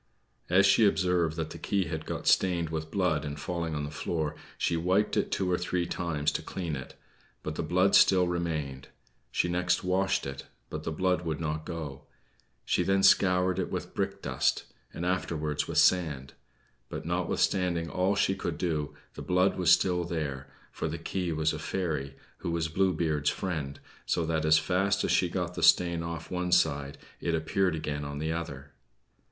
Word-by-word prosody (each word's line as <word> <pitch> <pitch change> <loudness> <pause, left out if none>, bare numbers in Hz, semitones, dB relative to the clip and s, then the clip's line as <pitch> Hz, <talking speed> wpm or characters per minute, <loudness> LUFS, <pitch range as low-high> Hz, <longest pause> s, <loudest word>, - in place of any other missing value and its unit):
As 95 +3 +5
she 105 +2 +6
observed 90 -5 +1
that 80 -1 -3
the - - -8
key 100 -1 0
had 80 -2 -5
got - - -4
stained 85 -3 +3
with 80 -1 -3
blood 90 -5 +1
in 70 -1 -4
falling 80 +1 -3
on 75 - -2
the 75 - -5
floor, 80 0 -2 0.2
she 85 - 0
wiped 90 +5 +1
it - - +1
two 95 -2 0
or 90 - +1
three 90 0 -1
times 80 -4 -1
to - - -3
clean 85 -5 -4
it; 65 -2 -8 0.5
but 75 - -3
the - - -3
blood 90 +5 +2
still 90 -2 +6
remained; 80 -6 -3 0.4
she - - 0
next 90 0 +1
washed 95 +1 +1
it; 70 0 -6 0.2
but 75 0 -5
the 80 - -1
blood 90 +1 0
did 80 -2 -2
not 75 -1 -3
go; 75 -5 -5 0.6
she - - +2
then 95 +2 +2
scoured 90 -1 +4
it 95 - -1
with - - -5
brickdust, - - 0 0.3
and 85 - -5
afterwards 80 -5 -1
with - - -3
sand. 75 -7 +3 0.6
But - - -6
notwithstanding 90 -3 0
all 95 +3 +1
she 95 - +2
could 85 -4 -4
do, 80 -5 -2 0.2
the - - -8
blood 90 +1 +2
was 90 -3 +1
still 90 0 +4
there, 75 -6 -4 0.2
for - - -3
the - - -3
key 90 -3 -3
was 80 0 +1
a - - -5
fairy, 75 -7 -3 0.2
who - - -4
was 85 -1 -1
Blue 95 +4 +2
Beard's 75 -4 0
friend, 75 -7 -3 0.3
so 85 - +1
that 80 -1 0
as 80 0 +6
fast 95 +5 +1
as - - +1
she 90 - +3
got 90 -1 -2
the - - -5
stain 85 -1 +5
off 85 -1 -6
one 90 0 -2
side 70 -5 +2 0.2
it 85 - 0
appeared 85 +3 +1
again 75 -2 -3
on 70 0 -5
the 80 +2 -2
other. 70 -4 -5
85 Hz, 185 wpm, -29 LUFS, 75-90 Hz, 0.6 s, she